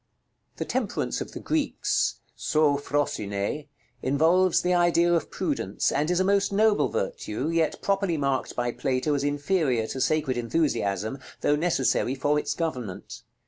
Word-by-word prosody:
The - - -4
Temperance - - -2
of - - -6
the - - -6
Greeks, 310 -2 0
[Greek: - - -40
sôphrosynê], 145 - 0 0.3
involves 165 +6 +3
the 180 0 +2
idea 175 0 +3
of 170 - 0
Prudence, - - -1
and 150 +3 0
is 180 0 +2
a - - +3
most 200 +1 +2
noble 210 +1 +3
virtue, 105 +8 -3
yet 165 -1 0
properly 195 -4 +1
marked 140 -2 -1
by 120 0 0
Plato 130 +4 -1
as 140 -1 0
inferior 145 -4 +1
to 130 +4 -4
sacred 135 -2 +1
enthusiasm, 115 - -1 0.2
though 145 - +3
necessary 150 -5 +1
for 145 +2 +1
its - - -3
government. 125 - -4
150 Hz, 145 wpm, -26 LUFS, 130-175 Hz, 0.3 s, involves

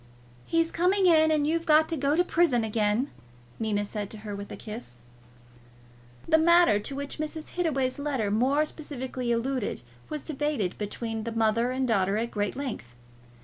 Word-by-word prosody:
"He's 330 0 +1
coming 370 +3 +2
in, 315 -3 +6
and 305 -2 +2
you've 330 +2 0
got 310 0 +5
to 330 - -1
go 285 0 +1
to 355 - +4
prison 330 -9 +2
again," 220 +4 0 0.5
Nina 210 -2 0
said 205 -1 -5
to 220 - -8
her, 205 -1 -4
with 200 0 -8
a - - -5
kiss. 210 - -8 1.3
The 320 - +5
matter 340 -9 +5
to 270 +6 -6
which 280 +1 -5
Mrs. 310 0 -4
Hittaway's 275 -7 -1
letter 265 -8 -1
more 265 +8 +2
specially 260 -5 -4
alluded 235 - -1 0.3
was 305 -2 -4
debated 295 - -1
between 225 +2 -4
the 230 - -4
mother 225 +1 +2
and 260 0 -1
daughter 200 -3 +2
at 235 +2 -2
great 205 -2 -2
length. 245 - -5
260 Hz, 170 wpm, -27 LUFS, 215-310 Hz, 1.3 s, in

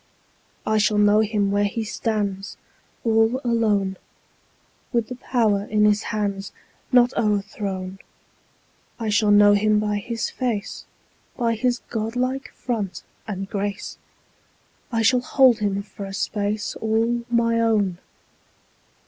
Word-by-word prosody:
I 215 0 +2
shall 210 0 +2
know 205 0 +5
him 210 -2 +1
where 205 0 +2
he 220 +3 -2
stands 210 -3 -3 0.5
All 225 +2 +3
alone, 215 -5 +1
10 - - -18 1.0
With 235 -2 +1
the 250 - -5
power 220 -5 +1
in 210 0 +2
his 210 0 +3
hands 200 -2 -2 0.4
Not 250 -1 +5
o'erthrown; 195 -3 -2 1.0
I 225 -2 -2
shall 210 0 +3
know 205 0 +7
him 210 +1 +3
by 210 -1 0
his 230 +2 -3
face, 235 -6 -3 0.5
By 235 -2 +1
his 245 +2 -1
godlike 250 +4 -2
front 210 -8 -4 0.2
and 195 -2 -4
grace; 200 +1 -4 0.9
I 225 -1 +1
shall 250 +3 +4
hold 250 -2 +4
him 200 -1 -1
for 200 0 -9
a 195 0 -6
space 205 +1 -2
15 220 - -5
All 230 +2 +1
my 230 -1 +2
own! 210 -6 +1
215 Hz, 130 wpm, -23 LUFS, 205-230 Hz, 1.0 s, know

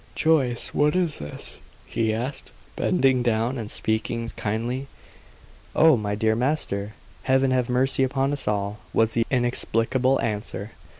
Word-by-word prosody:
"Joyce, 140 -7 +2
what 150 +3 +2
is 175 -5 0
this?" 75 0 -4 0.3
he 110 -1 -1
asked, 125 +5 -4 0.2
bending 135 -8 +2
down 120 +2 0
and 110 -2 -5
speaking 115 +2 -1
kindly. 115 +4 -3 0.9
"Oh, 160 -2 +6
my 105 -3 -2
dear 110 +1 +1
master! 110 -6 -1 0.3
Heaven 130 0 +2
have 125 -2 +1
mercy 130 +2 +2
upon 135 +1 +1
us 145 - -1
all!" 100 0 -1 0.2
was 110 0 +3
the 115 -1 +1
inexplicable 125 +1 +1
answer. 105 -1 -3
120 Hz, 135 wpm, -24 LUFS, 110-135 Hz, 0.9 s, Oh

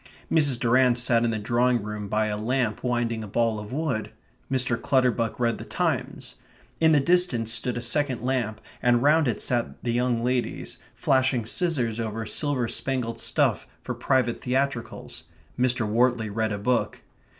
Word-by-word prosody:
Mrs. 145 -6 +3
Durrant 125 +1 +3
sat 120 -1 +2
in 120 - +2
the 110 - -1
drawing 120 +2 +1
room 105 -1 -5
by 110 +2 +1
a 105 -1 -2
lamp 115 +1 -1
winding 120 -2 -1
a - - -7
ball 115 +1 0
of 105 +1 -9
wool. 135 -5 -1 0.5
Mr. 125 -2 +1
Clutterbuck 125 -4 +1
read 115 -2 0
the - - -6
Times. - - -3 0.4
In 160 -1 +5
the 150 - +5
distance 135 -8 +2
stood 125 0 -2
a 120 - -4
second 130 -1 0
lamp, 125 -4 -1 0.2
and 120 0 +3
round 150 +1 +4
it 120 - -1
sat 120 -2 -2
the 120 - -1
young 120 -1 0
ladies, 125 0 -2 0.2
flashing 130 -3 +1
scissors 125 -5 0
over 110 0 -3
silver 140 -1 -1
spangled 115 -2 -2
stuff - - +1 0.2
for - - -3
private 130 -3 0
theatricals. 130 -9 -3 0.3
Mr. 125 -3 +2
Wortley 115 0 +1
read 110 +1 -1
a 100 - -2
book. 120 +4 -1
120 Hz, 165 wpm, -25 LUFS, 115-130 Hz, 0.5 s, In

